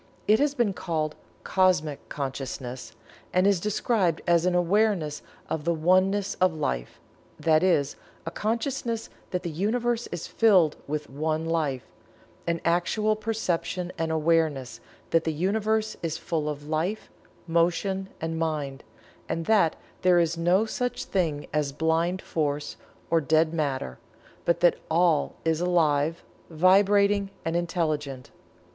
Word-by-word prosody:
It 215 +1 +5
has 290 0 +1
been 235 -6 +1
called 155 -4 -2 0.3
"Cosmic 175 -6 +1
Consciousness," 130 -2 -5 0.4
and 185 +1 +3
is 200 -3 +4
described 205 -3 +1
as 170 0 +3
an 180 - +2
awareness 180 -4 +1 0.3
of 160 - -3
the 170 +1 +1
Oneness 185 +4 +2
of 185 -3 +3
Life 60 - -3 0.4
that 155 -1 +3
is, 170 -7 +2 0.3
a 165 - -4
consciousness 230 +2 -2 0.2
that 180 -1 -3
the 170 - -3
Universe 235 +7 0
is 175 -2 -5
filled 185 -9 +4
with 150 0 -3
One 155 +3 -2
Life 155 -6 -1 0.6
an 170 0 0
actual 210 +6 +2
perception 180 -5 -2
and 165 -1 -2
"awareness" 155 -5 +1 0.3
that 165 -1 +3
the 160 - 0
Universe 215 +6 0
is 165 -1 -2
full 155 -3 -2
of 145 0 -6
Life, 165 +8 -2 0.3
Motion 175 +3 0
and 165 0 -3
Mind, 150 -4 -2 0.5
and 165 - -2
that 195 -6 +3 0.3
there 180 -1 +5
is 170 -1 +2
no 175 +5 +3
such 245 +2 -3
thing 160 -6 -1
as 150 -2 0
Blind 165 +5 0
Force, 145 -2 -2 0.4
or 165 -1 +4
Dead 160 +2 +2
Matter, 135 - -2 0.5
but 170 0 +1
that 175 - +4
All 165 -1 +2
is 160 0 +1
alive, 165 -2 +2 0.3
vibrating 200 +4 +4 0.2
and 165 +1 -1
intelligent. 155 -6 -2
170 Hz, 135 wpm, -26 LUFS, 155-190 Hz, 0.6 s, It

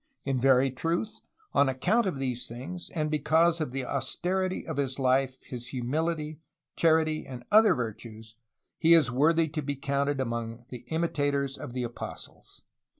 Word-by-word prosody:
"In 135 -2 0
very 135 +1 +4
truth, 170 - -2 0.3
on 140 - +4
account 195 - +1
of 180 - -2
these 125 -2 -3
things, 150 +10 -7
and 155 -2 -1
because 160 +3 +3
of 150 - -2
the 135 0 -3
austerity 180 +8 -2
of - - -5
his 135 -2 -1
life, 130 0 +1
his 120 -1 -7
humility, 150 +4 -2 0.4
charity, 160 -1 +3
and 125 -2 -8
other 215 +1 +6
virtues, 110 -2 -6 0.4
he 165 +1 +7
is 150 -7 +4
worthy 160 +5 +3
to 155 +1 -3
be 145 0 -3
counted 140 +1 -1
among 115 -1 -3
the 125 -1 -9
imitators 145 -4 0
of 120 - -8
the 125 -1 -2
apostles. 120 0 -8
140 Hz, 155 wpm, -28 LUFS, 125-160 Hz, 0.4 s, he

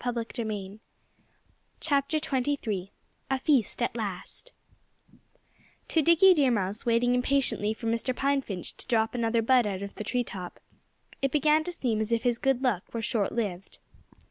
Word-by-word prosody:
XXIII 220 -4 -4 1.1
A 270 - -2
FEAST 260 -5 +1
AT 235 - -1
LAST 215 - -6 1.4
To 320 - +3
Dickie 335 +5 +6
Deer 285 -6 +3
Mouse, 205 -1 -1
waiting 235 +1 +3
impatiently 250 -4 +1
for 230 - -9
Mr. 230 +3 0
Pine 275 +1 +1
Finch 195 -8 -5
to - - -5
drop 225 -3 +1
another 230 -1 +1
bud 245 -1 +4
out 195 -1 -3
of 200 - -7
the - - -6
tree 245 +3 0
top, 185 -6 -8 0.6
it 275 -1 +1
began 305 +1 +3
to 355 - -3
seem 235 -10 -1
as 220 +1 -2
if 230 -1 +1
his 240 -2 +1
good 270 -1 +1
luck 215 -8 -1
were 230 - -2
short 215 -2 0
lived. 195 -6 -4
235 Hz, 150 wpm, -28 LUFS, 215-270 Hz, 1.4 s, Dickie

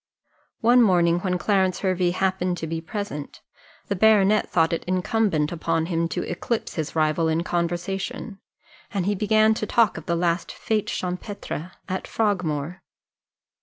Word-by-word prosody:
One 240 +2 +6
morning, 175 -5 +4
when 180 0 -1
Clarence 190 -1 +1
Hervey 185 -2 +1
happened 185 0 0
to 160 - -4
be 160 0 -3
present, 165 -5 -6 0.4
the 200 - -2
baronet 210 0 +4
thought 165 -1 +2
it 165 - -2
incumbent 185 -3 +1
upon 165 -1 -1
him 165 -1 0
to - - -2
eclipse 220 +6 -3
his 160 -1 -4
rival 155 +1 +2
in 160 +1 +1
conversation, 190 +6 -3 0.5
and 195 -4 -2
he 205 - +2
began 215 +2 +3
to 215 -1 -3
talk 230 -3 +3
of 160 - -9
the 170 - +1
last 170 0 0
fête 220 -3 -1
champêtre 180 -2 -5
at 190 -1 -3
Frogmore. 180 -5 -1
180 Hz, 150 wpm, -24 LUFS, 170-205 Hz, 0.5 s, One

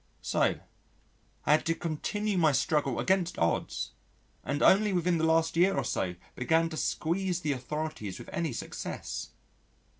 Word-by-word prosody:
So - - +1 0.9
I - - +3
had 150 - +5
to 165 - +2
continue 200 +7 -2
my 160 -5 +4
struggle 140 -2 +1
against 185 -2 +1
odds, 85 0 0 0.5
and 145 +1 -1
only 205 +1 +5
within 175 -1 +2
the - - 0
last 160 0 +3
year 185 +3 +4
or - - +1
so 90 -1 -1 0.2
began 160 +6 +2
to 160 - -6
squeeze 180 +3 -1
the 150 -3 0
authorities 135 -6 -4
with - - -10
any 165 -3 -1
success. - - -5
160 Hz, 150 wpm, -30 LUFS, 150-180 Hz, 0.9 s, had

